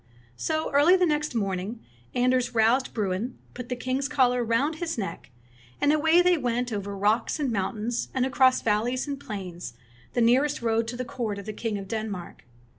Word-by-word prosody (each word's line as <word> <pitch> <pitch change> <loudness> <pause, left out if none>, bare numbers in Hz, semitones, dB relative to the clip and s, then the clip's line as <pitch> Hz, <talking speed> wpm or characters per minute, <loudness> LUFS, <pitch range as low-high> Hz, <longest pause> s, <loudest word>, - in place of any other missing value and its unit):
So 315 - -2
early 295 +6 +6
the 365 -1 +3
next 300 -4 -1
morning 200 +1 -2 0.4
Anders 250 0 +1
roused 230 +4 +3
Bruin, 210 +3 -2 0.2
put 250 -1 -8
the 250 - -1
king's 255 +2 -2
collar 250 -4 +2
round 270 +8 +1
his 330 -3 -3
neck, 195 - -5 0.5
and 290 - +3
away 320 +3 +4
they 355 -2 +4
went 245 -1 -1
over 200 -1 -4
rocks 215 +8 +1
and 280 -4 0
moun 200 0 -1
tains, 230 +2 -2
and 255 -1 +1
across 260 0 +3
valleys 230 +5 0
and 280 -1 -4
plains, 180 - -7 0.4
the 240 - +1
near 245 +4 +5
est 295 -5 -3
road 225 0 +1
to 240 +1 -5
the 255 - -3
court 225 -5 -3
of 200 - -8
the 215 - -5
king 215 -1 -3
of 195 -1 -7
Denmark. 215 -4 -5
240 Hz, 190 wpm, -26 LUFS, 215-270 Hz, 0.5 s, early